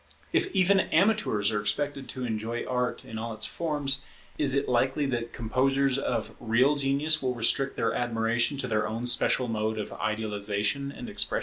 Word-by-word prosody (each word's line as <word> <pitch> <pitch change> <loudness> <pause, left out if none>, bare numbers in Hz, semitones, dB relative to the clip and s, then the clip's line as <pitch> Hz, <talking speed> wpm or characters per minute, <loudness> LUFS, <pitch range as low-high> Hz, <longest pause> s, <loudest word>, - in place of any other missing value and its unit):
If - - +2
even 190 +1 +4
amateurs 190 - +2
are 105 -1 0
expected 135 +6 -1
to 130 -1 -4
enjoy 115 +1 -3
Art 125 -1 -2
in 110 -1 -6
all 115 0 -4
its 110 - -1
forms, 145 -4 0 0.3
is 140 -2 +2
it 140 0 +1
likely 130 +4 +1
that 120 -3 -2
composers 135 +3 +1
of 115 -5 -2
real 120 +5 +3
genius 145 +3 +1
will 130 -2 -1
restrict 135 +4 +1
their 115 - +1
admiration 120 +2 0
to 130 - -1
their 110 -2 0
own 115 +2 -4
special 125 +1 +2
mode 110 -1 -1
of 105 - -4
idealization 105 +4 -1
and 240 - -8
expression? 210 -1 +2
125 Hz, 175 wpm, -28 LUFS, 110-140 Hz, 0.3 s, even